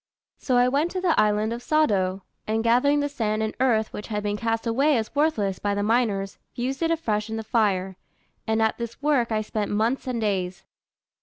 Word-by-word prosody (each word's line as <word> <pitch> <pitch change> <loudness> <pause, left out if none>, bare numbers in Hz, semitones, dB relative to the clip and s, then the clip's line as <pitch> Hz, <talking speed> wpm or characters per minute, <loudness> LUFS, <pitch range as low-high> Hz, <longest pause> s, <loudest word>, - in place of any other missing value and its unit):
So 255 -2 +1
I 245 0 +5
went 285 +6 +1
to 375 - -1
the 360 -3 +2
island 215 +1 +2
of 235 - -6
Sado, 195 -12 +1 0.2
and 220 +1 0
gathering 265 +5 +3
the 285 - 0
sand 220 -6 -1
and 220 - -2
earth 225 -4 +2
which 210 - -6
had 210 -2 -3
been 205 0 -1
cast 225 +1 -2
away 270 +5 +2
as 220 -1 -3
worthless 255 - +1
by 205 0 -1
the 205 - -1
miners, 210 -3 0 0.2
fused 260 +4 -3
it 330 - +2
afresh 220 -10 -1
in 220 - -3
the 220 - -4
fire; 195 -5 0 0.5
and 220 0 +2
at 220 - 0
this 235 0 -6
work 275 -6 +2
I 215 -1 +1
spent 215 -1 -3
months 225 +6 0
and 250 -2 -1
days." 190 -4 -2
225 Hz, 210 wpm, -25 LUFS, 210-255 Hz, 0.5 s, I